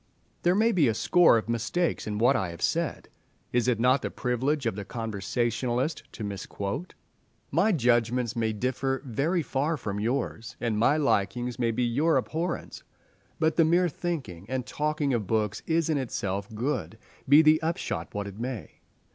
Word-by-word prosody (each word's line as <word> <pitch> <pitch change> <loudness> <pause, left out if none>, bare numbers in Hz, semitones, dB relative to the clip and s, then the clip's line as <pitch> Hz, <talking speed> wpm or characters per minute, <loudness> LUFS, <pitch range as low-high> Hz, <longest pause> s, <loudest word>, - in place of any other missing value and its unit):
There 175 +1 +3
may 225 +3 +4
be 165 - +3
a 110 - +1
score 165 +5 +5
of 110 - -3
mistakes 120 +10 -1
in 105 -1 -2
what 125 +5 +4
I 95 -7 0
have 85 -1 -7
said—is 120 0 -2
it 120 -3 +2
not 125 +3 +4
the - - -2
privilege 130 +3 -1
of 115 - 0
the 100 - -5
conversationalist 120 - -2
to 110 - -6
misquote? 100 - -5 0.6
My 220 - +3
judgments 120 - +2
may 110 -1 0
differ 130 +4 -1
very 155 +8 0
far 145 +4 -1
from 100 -6 -4
yours, 115 -1 -2
and 115 -3 -1
my 135 +7 +4
likings 125 -2 0
may 120 -2 +2
be 115 +2 0
your 145 +8 +2
abhorrence; 170 +2 -3 0.6
but 160 -1 +1
the 165 - +6
mere 175 +3 +3
thinking 135 - -5
and 130 -1 -2
talking 150 0 -1
of 110 -5 -1
books 105 -2 0
is 165 -1 +2
in 155 -3 +1
itself 100 -5 -3
good, 120 - -2 0.3
be 145 +3 +8
the 155 0 +5
upshot 165 - -3
what 100 0 -2
it 100 +1 -8
may. 120 -3 -5
125 Hz, 170 wpm, -27 LUFS, 110-155 Hz, 0.6 s, be